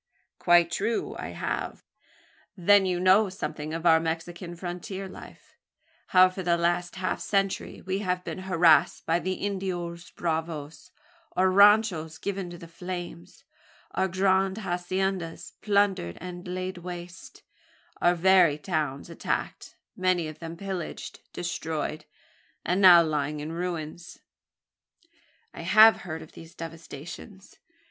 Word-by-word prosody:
"Quite 175 -1 +4
true 220 +3 -1
I - - -4
have." - - -4 0.7
"Then 195 +2 +5
you 180 -1 0
know 190 +3 +5
something 155 -5 -5
of 165 +1 -5
our 160 -1 +6
Mexican 170 +2 -4
frontier 180 +2 -6
life 185 - -13 0.5
how 185 0 +7
for 190 - -6
the 170 -1 +2
last 175 +1 0
half 185 -1 -2
century 195 -1 -1
we 190 +1 -2
have 180 -2 -1
been - - -6
harassed 165 -3 +4
by 165 +1 +2
the 185 +3 -2
Indios 180 -4 -4
bravos 160 -1 -4 0.5
our 185 +1 +3
ranchos 200 -5 +4
given 195 -2 -4
to 175 - -9
the 170 -1 -11
flames 175 - -8 0.5
our 190 - 0
grand 190 +1 +1
haciendas 185 -2 -3
plundered 200 - +1
and 180 0 -8
laid 185 0 -4
waste 175 +1 -9 0.6
our 175 0 +4
very 175 -3 +5
towns 150 -4 -2
attacked - - -4 0.2
many 185 -3 +1
of 155 - -9
them 165 0 -7
pillaged, 190 -2 -6
destroyed, 160 -3 -4 0.6
and 180 +4 +1
now 175 -3 +9
lying 150 -1 -2
in 150 +2 -5
ruins." 170 0 -5 1.4
"I - - -8
have 220 +1 +7
heard 160 -3 -7
of 155 - -15
these 165 +1 -13
devastations. 165 +4 -10
175 Hz, 130 wpm, -27 LUFS, 165-190 Hz, 1.4 s, now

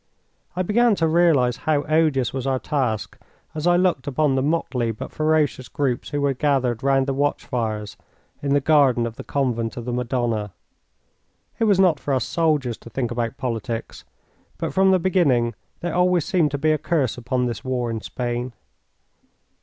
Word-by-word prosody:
I 185 - 0
began 225 +3 +3
to 165 -3 +1
realise 155 -7 +3
how 150 0 0
odious 155 -5 +1
was 135 0 -3
our 135 -1 +1
task 130 -7 -2 0.3
as 155 +2 -2
I 175 - +5
looked 175 -8 +1
upon 145 +1 +1
the 130 - +1
motley 135 -5 0
but 110 - -7
ferocious 155 -4 0
groups 130 -4 -2
who 145 - -2
were 140 -1 +2
gathered 130 -4 0
round 135 0 +2
the 135 - -1
watch 145 +2 -1
fires 110 -5 -3 0.4
in 140 0 +1
the 145 - +3
garden 135 -5 +3
of 115 -1 -5
the - - -8
Convent 120 -5 -1
of 120 - -5
the 125 - -3
Madonna. 120 -5 -1 1.1
It 225 - +3
was 200 -3 +3
not 180 -6 +4
for 140 - -1
us 130 - 0
soldiers 150 -8 0
to - - -12
think 120 +1 -3
about 120 +1 -2
politics, 115 -3 -4 0.5
but - - -3
from 190 +3 +4
the 190 - +5
beginning 150 -11 +2 0.3
there 175 -1 -3
always 180 -2 +2
seemed 170 -5 +2
to 145 - -3
be 155 +2 +2
a 155 - +1
curse 155 -4 0
upon 125 +1 -1
this 115 -4 -4
war 125 -2 -2
in 110 -1 -4
Spain. 120 +1 -4
135 Hz, 185 wpm, -22 LUFS, 120-155 Hz, 1.1 s, I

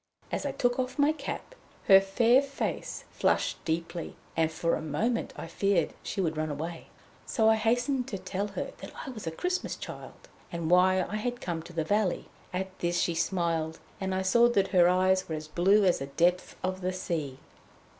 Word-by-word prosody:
As - - -1
I - - -1
took 245 +1 0
off 255 +2 -2
my 290 +1 +4
cap, 310 - -6 0.3
her 195 0 +8
fair 230 +6 +4
face 280 0 -4
flushed - - 0
deeply, 165 +1 -3 0.2
and 160 -1 +2
for 165 +1 0
a - - 0
moment 185 +11 -1
I - - -5
feared 195 -5 +1
she 205 - -5
would 160 -4 0
run 155 0 -1
away. 160 +3 -5 0.4
So 220 -2 +2
I 220 - +7
hastened 245 +4 +1
to 195 - -4
tell 195 +2 -3
her - - -2
that - - -8
I 270 - -5
was 215 -8 -8
a - - -1
Christmas 360 - -2
Child, - - -9 0.2
and 170 -1 -2
why 185 +1 +5
I 210 - -3
had 245 +3 -3
come 170 -6 -3
to 175 - -12
the 165 -1 0
valley. 205 +1 0 0.2
At 185 +1 -4
this 175 0 0
she 175 - +1
smiled, 165 -2 0 0.2
and 190 -1 -1
I 190 - 0
saw 235 +5 +5
that 195 -5 +2
her 175 -2 +5
eyes 185 0 +2
were 160 - -1
as 155 0 -6
blue 195 +6 +4
as 180 - +3
the 135 - -4
depths 175 +5 +1
of 185 0 -2
the 185 +1 -1
sea. 160 -7 -3
185 Hz, 200 wpm, -29 LUFS, 165-215 Hz, 0.4 s, her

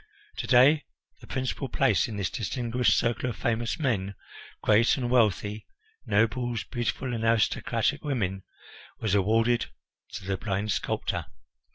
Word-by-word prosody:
To - - -4
day 140 +5 +5 0.3
the - - -14
principal 130 +1 -3
place 135 +2 +2
in 110 -3 -6
this 95 -5 -2
distinguished 120 +1 0
circle 120 +1 0
of 115 - -5
famous 120 -1 -1
men, 105 - -1 0.5
great 110 +5 +4
and 120 -2 -2
wealthy 105 -3 +1 0.4
nobles, 115 +2 +1
beautiful 120 +1 -3
and 115 -1 -3
aristocratic 115 -2 +1
women, 95 -10 -1 0.6
was 110 -3 -1
awarded 115 +4 +2 0.5
to 95 - -6
the 95 0 -1
blind 105 +1 -2
sculptor. - - -2
115 Hz, 135 wpm, -27 LUFS, 105-125 Hz, 0.6 s, day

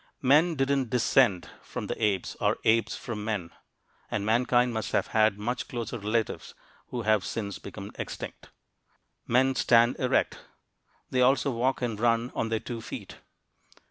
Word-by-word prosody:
Men 155 +6 +4
didn't 135 -2 +1
"descend" 120 -5 +3
from - - -6
the - - -4
apes 100 -4 0
or - - +2
apes 115 +1 +2
from 110 -3 -6
men, 100 -6 -3 0.6
and 100 - -2
mankind 120 +2 +2
must 110 -1 -3
have - - +2
had 110 -2 +3
much 120 +4 -3
closer 120 -1 -4
relatives 110 +2 -2 0.3
who 120 -2 -4
have 110 -2 +3
since 100 -2 -4
become - - -8
extinct. - - -7 0.8
Men 130 +3 +3
stand 120 -1 +4
erect. 130 - +1 0.7
They 130 - +2
also 135 +2 +3
walk 125 +2 0
and 115 -4 -2
run 115 +1 +1
on 115 - -2
their 110 -1 0
two 115 -1 -6
feet. - - -8
115 Hz, 150 wpm, -28 LUFS, 110-125 Hz, 0.8 s, Men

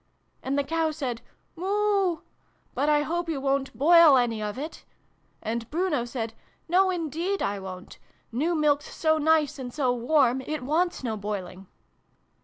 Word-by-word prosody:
And 270 +2 -2
the 285 - +2
Cow 325 +2 0
said 265 -7 -4 0.2
' - - -43
Moo! 390 -1 +1 0.5
But 295 - 0
I 295 -1 +3
hope 340 +2 -2
you 305 -4 -1
wo'n't 275 0 0
boil 320 0 +7
any 235 -3 0
of 210 +2 -4
it? 305 +4 -7 0.3
' - - -41
And 230 +1 -3
Bruno 315 -6 0
said 230 -2 -4 0.2
' - - -39
No, 375 +3 +4
indeed 345 +3 -2
I 200 0 -1
won't! 185 -1 -9 0.3
New 310 +9 0
Milk's 295 -2 +1
so 315 -1 +2
nice 310 -2 +2
and 250 -2 -6
so 255 -2 +1
warm, 250 +1 +2
it 300 0 -4
wants 330 +4 0
no 225 -3 -2
boiling 195 -2 -6
290 Hz, 170 wpm, -26 LUFS, 240-330 Hz, 0.5 s, boil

